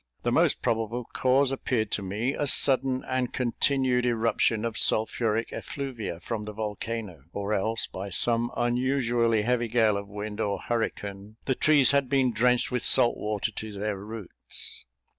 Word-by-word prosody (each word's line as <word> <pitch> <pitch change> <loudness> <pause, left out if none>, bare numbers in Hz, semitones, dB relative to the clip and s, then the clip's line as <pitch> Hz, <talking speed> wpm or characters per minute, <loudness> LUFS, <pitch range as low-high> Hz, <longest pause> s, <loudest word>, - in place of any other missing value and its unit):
The - - 0
most - - +2
probable 115 +2 -1
cause 130 +1 +2
appeared 120 -5 -1
to - - -1
me, 105 +7 -2
a 145 - -2
sudden 130 -1 +4
and 130 -1 -1
continued 125 0 +1
eruption 115 -1 +1
of 115 -1 -3
sulphuric 110 0 +1
effluvia 120 - -5
from 105 +4 -5
the 105 - -7
volcano; 105 - -5
or 100 +1 -2
else, 110 +3 -1
by 95 +2 -7
some 115 +5 +2
unusually 120 -2 +1
heavy 120 0 0
gale 110 -3 +2
of 100 0 -6
wind 105 +1 -6
or 100 -3 -1
hurricane, 105 -3 -4
the 135 - +1
trees 145 -1 +4
had 140 -2 +1
been 130 -2 +2
drenched 125 +3 +2
with 125 -2 -1
salt 120 - +5
water 105 +1 -2
to 110 +1 -7
their 105 +1 -3
roots. 105 - -2
115 Hz, 160 wpm, -27 LUFS, 105-125 Hz, -, salt